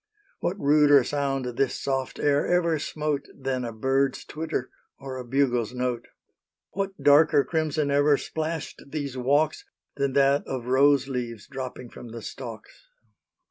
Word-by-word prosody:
What 190 +3 -2
ruder 145 -2 +5
sound 135 -1 -1
this 125 +2 -1
soft 135 -1 -2
air 145 0 +2
ever 170 -3 +2
smote 150 -1 -2
Than 130 -1 -2
a 120 - -4
bird's 135 +4 0
twitter 155 -4 -4 0.3
or 135 -1 -7
a 130 - -5
bugle's 125 -2 0
note? 125 -1 -2 0.6
What 195 0 -4
darker 145 0 +6
crimson 155 -2 -1
ever 145 0 +4
splashed 160 +1 -4
these 140 -2 -4
walks 145 +5 +1 0.3
Than 140 -1 0
that 140 +1 +3
of 130 -3 -4
rose 135 +1 +4
leaves 120 -5 -4
dropping 130 -3 -7
from - - -10
the 115 -1 -8
stalks? 120 - -9
140 Hz, 140 wpm, -26 LUFS, 125-150 Hz, 0.6 s, darker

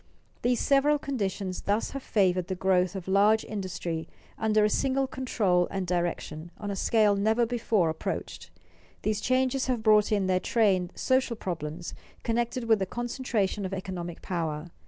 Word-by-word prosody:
These 245 0 +2
several 285 +2 +3
conditions 200 -9 -3
thus 205 +2 0
have 275 - -5
favored 185 -6 +1
the 190 - -2
growth 185 0 +2
of 190 -2 -6
large 205 +3 +4
industry 180 -5 -4 0.3
under 215 -1 +2
a - - +5
single 270 +5 +1
control 210 -9 +1
and 190 -1 -3
direction, 175 -2 -2
on 205 -1 -4
a - - -2
scale 210 +1 +3
never 220 +4 +2
before 225 -6 +1
approached. 160 0 -4 0.5
These 215 -1 0
changes 255 +1 +1
have 245 -4 -1
brought 215 -1 +5
in 200 -2 +2
their 185 -1 +2
train 190 -5 +2
social 260 -2 +1
problems 170 -3 -5 0.3
connected 235 +2 -1
with 225 -2 +3
the 190 - -1
concentration 235 -4 -2
of 190 0 -3
economic 180 -3 -6
power. 165 -3 -3
205 Hz, 155 wpm, -28 LUFS, 185-235 Hz, 0.5 s, a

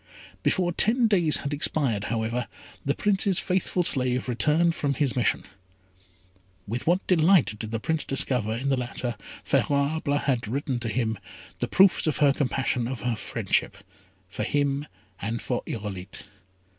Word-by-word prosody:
Before 180 -2 +2
ten 235 +7 +3
days 175 -8 +4
had 140 - -2
expired, 135 -8 +1
however, 115 +2 -2 0.4
the 140 +2 0
Prince's 195 -2 +2
faithful 180 -1 0
slave 125 -5 +1
returned 150 +7 +2
from 140 -3 -1
his 135 -2 0
mission. 120 -5 +1 1.2
With 115 +7 -4
what 180 +3 +2
delight 165 - +3
did 110 - -5
the 115 0 -2
Prince 160 +6 0
discover 125 -5 0
in 130 +4 -2
the 135 - +3
letter 120 -1 -3 0.3
Favourable 145 +1 +1
had 130 -6 -1
written 130 +1 -2
to 120 -1 -3
him, 110 -3 -1 0.4
the 120 - -1
proofs 190 +3 +4
of 155 - +1
her 145 -2 +4
compassion 130 -3 -1
and 130 - -3
of 125 - -8
her 120 -2 -1
friendship 105 - -1 0.5
for 95 - -6
him 140 +4 0 0.3
and 110 +3 -2
for 125 +1 -2
Irolite. 100 -4 -5
135 Hz, 155 wpm, -26 LUFS, 115-155 Hz, 1.2 s, days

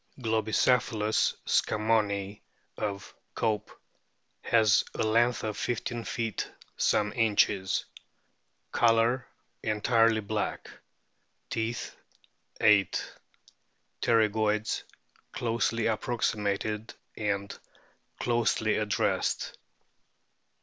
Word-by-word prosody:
* - - -20
Globicephalus 110 -1 +2
scammonii, 105 -2 +1 0.3
of 100 -2 -4 0.2
Cope,f 110 -2 -1 0.7
has 110 -4 +5
a - - 0
length 120 +2 +2
of 110 -1 -3
1 120 - 0 0.3
5 - - -7
feet 115 -3 -3 0.2
some 105 0 +1
inches. 105 -4 +2 0.9
Colour 115 +2 +3 0.3
entirely 115 +1 +2
black. 105 0 -3 0.8
Teeth, 115 +1 -3 0.6
8. 105 -2 +3 0.9
Pterygoids 110 -1 +2 0.5
closely 115 -1 0
approximated 110 -2 -1 0.2
and 100 -2 -2 0.6
closely 115 -2 +1
ad 105 -1 -2
dressed. - - 0
110 Hz, 75 wpm, -29 LUFS, 105-115 Hz, 0.9 s, has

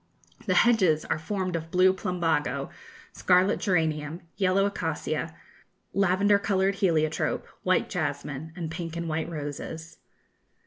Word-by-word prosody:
The - - +2
hedges 185 -10 +4
are - - -1
formed 185 +1 -2
of 165 0 -4
blue 185 +2 +4
plumbago, 160 - -1 0.4
scarlet 185 +2 +3
geranium, 160 -3 0
yellow 195 0 +2
acacia, 200 - -3 0.6
lavender 200 +1 +3
coloured 195 -1 +1
heliotrope, 160 -5 0 0.2
white 185 0 +2
jasmine, 145 -1 -3
and 165 -3 -5
pink 165 0 -5
and 170 0 -3
white 160 +1 -2
roses. 160 +2 -6
170 Hz, 120 wpm, -27 LUFS, 155-190 Hz, 0.6 s, hedges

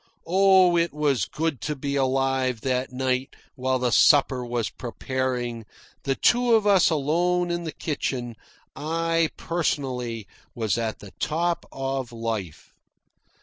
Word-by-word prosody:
Oh, 185 0 +5
it 170 -2 +1
was 140 -8 +1
good 155 -2 -3
to 150 - -2
be 140 0 -3
alive 135 -2 +1
that 130 0 -1
night 130 +1 -1 0.2
while 130 0 0
the 125 -1 0
supper 135 +1 +5
was 120 -2 -2
preparing, 125 -1 -3 0.4
the 135 -1 +1
two 240 - +4
of 220 -2 +2
us 195 -3 +5
alone 175 +4 +1
in 170 0 -2
the 160 - -3
kitchen. 125 -7 -3 0.4
I, 165 +1 0
personally, 130 - -2 0.3
was 110 -5 0
at 110 -1 -3
the 100 - -11
top 170 +2 -1
of 135 -2 -3
life. 115 -8 -5
135 Hz, 135 wpm, -25 LUFS, 125-165 Hz, 0.4 s, Oh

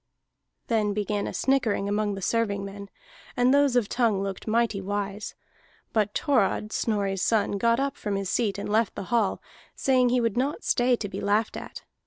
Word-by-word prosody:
Then 215 -3 +1
began 210 -1 -1
a - - -3
snickering 235 -7 +1
among 205 0 0
the 195 - -7
servingmen, 200 -2 -2 0.5
and 245 +2 +4
those 285 -2 +4
of 240 -4 +3
Tongue 220 -5 +1
looked 195 +1 -5
mighty 220 -2 +1
wise. 205 +1 -4 0.6
But 210 -2 +1
Thorod, 215 -5 +1
Snorri's 200 -4 -1
son, 205 -2 +1
got 235 +2 +3
up 275 0 -1
from 205 -2 -3
his 195 -1 -2
seat 205 0 0
and 200 - -4
left 215 0 +1
the - - -4
hall, 220 -5 +1 0.3
saying 255 -2 +3
he 250 +1 +2
would 230 -2 0
not 280 - -1
stay 245 0 +3
to 220 - -5
be 200 - -6
laughed 210 +2 +1
at. - - -8
215 Hz, 180 wpm, -26 LUFS, 200-240 Hz, 0.6 s, and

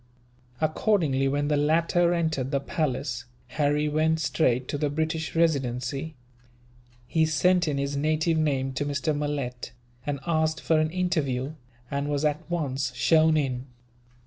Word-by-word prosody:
Accordingly, 155 -4 +1
when 145 +1 0
the 150 - +2
latter 165 +3 +2
entered 160 -6 0
the 140 -1 +1
palace, 130 -4 -2 0.2
Harry 150 0 +1
went 155 +2 +1
straight 130 -6 +1
to 145 - -1
the 150 -1 +1
British 160 +2 -2
Residency. 140 -2 0 0.9
He 160 +5 +1
sent 175 +3 +3
in 145 -2 0
his 140 +1 -2
native 155 +3 +1
name 135 -4 0
to 145 - -1
Mr. 145 +2 -1
Malet, 140 -5 -3 0.3
and 145 -1 -3
asked 160 -1 +1
for 160 -1 +2
an 155 0 +1
interview, 155 -7 -1 0.4
and 140 +1 -1
was 145 +1 0
at 150 0 +1
once 140 -6 -2
shown 160 +3 +4
in. 130 -3 -2
150 Hz, 145 wpm, -26 LUFS, 140-160 Hz, 0.9 s, shown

